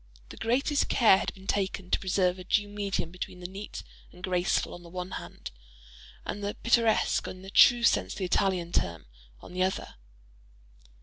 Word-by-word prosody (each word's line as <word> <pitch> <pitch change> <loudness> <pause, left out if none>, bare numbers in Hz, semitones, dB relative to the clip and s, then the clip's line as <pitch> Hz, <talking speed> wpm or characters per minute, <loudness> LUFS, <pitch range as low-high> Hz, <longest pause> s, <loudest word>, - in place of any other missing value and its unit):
The - - -10
greatest 270 +6 +1
care 215 -5 +6
had - - -2
been 190 0 -14
taken 190 -2 -2
to - - +3
preserve 185 -1 +1
a - - -7
due 205 +3 +1
medium 200 -4 -3
between 180 0 -7
the 180 - -10
neat 195 +3 -8 0.3
and 180 - -16
graceful 180 -1 0
on 175 - -9
the 170 - -13
one 180 +1 -6
hand, - - -7 0.7
and 205 - -5
the 205 +1 -2
pittoresque, 230 -2 +2
in 185 0 -8
the 195 - -9
true 240 +3 +7
sense - - +3
of - - -10
the 195 - -2
Italian 180 -2 +1
term, 85 - -1 0.4
on - - -12
the 185 - -2
other. 185 - -1
190 Hz, 185 wpm, -28 LUFS, 180-205 Hz, 0.7 s, true